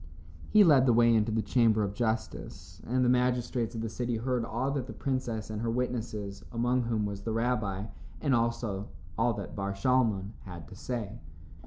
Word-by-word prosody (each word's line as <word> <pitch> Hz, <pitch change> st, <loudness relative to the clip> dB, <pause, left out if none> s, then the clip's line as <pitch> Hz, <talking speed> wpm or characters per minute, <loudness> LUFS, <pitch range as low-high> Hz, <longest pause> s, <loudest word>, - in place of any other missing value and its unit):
He 215 Hz, -1 st, +7 dB
led 140 Hz, -7 st, +6 dB
the 120 Hz, -, +5 dB
way 115 Hz, 0 st, +5 dB
into 110 Hz, 0 st, +2 dB
the 110 Hz, 0 st, 0 dB
Chamber 115 Hz, -4 st, +3 dB
of 100 Hz, -1 st, -2 dB
Justice, 110 Hz, +1 st, -3 dB
and 125 Hz, +2 st, +2 dB
the 125 Hz, +1 st, +5 dB
magistrates 120 Hz, -2 st, -1 dB
of 115 Hz, -, -3 dB
the 115 Hz, -, -2 dB
city 120 Hz, +1 st, -2 dB
heard 125 Hz, +1 st, -1 dB
all 120 Hz, +4 st, -1 dB
that 135 Hz, -3 st, -2 dB
the -, -, -7 dB
princess 120 Hz, -6 st, -2 dB
and 105 Hz, 0 st, -4 dB
her 115 Hz, -, -1 dB
witnesses, 110 Hz, -5 st, -3 dB
among 120 Hz, +2 st, +1 dB
whom 110 Hz, -2 st, 0 dB
was 100 Hz, -1 st, -4 dB
the 115 Hz, -, -3 dB
rabbi, 110 Hz, -4 st, 0 dB, 0.3 s
and 140 Hz, -3 st, +1 dB
also 115 Hz, -4 st, 0 dB, 0.3 s
all 120 Hz, -, +2 dB
that 100 Hz, -2 st, -6 dB
Bar 100 Hz, 0 st, -2 dB
Shalmon, 105 Hz, -3 st, +2 dB
had 85 Hz, -6 st, -9 dB
to -, -, -10 dB
say. 115 Hz, 0 st, -4 dB
115 Hz, 190 wpm, -30 LUFS, 105-125 Hz, 0.3 s, He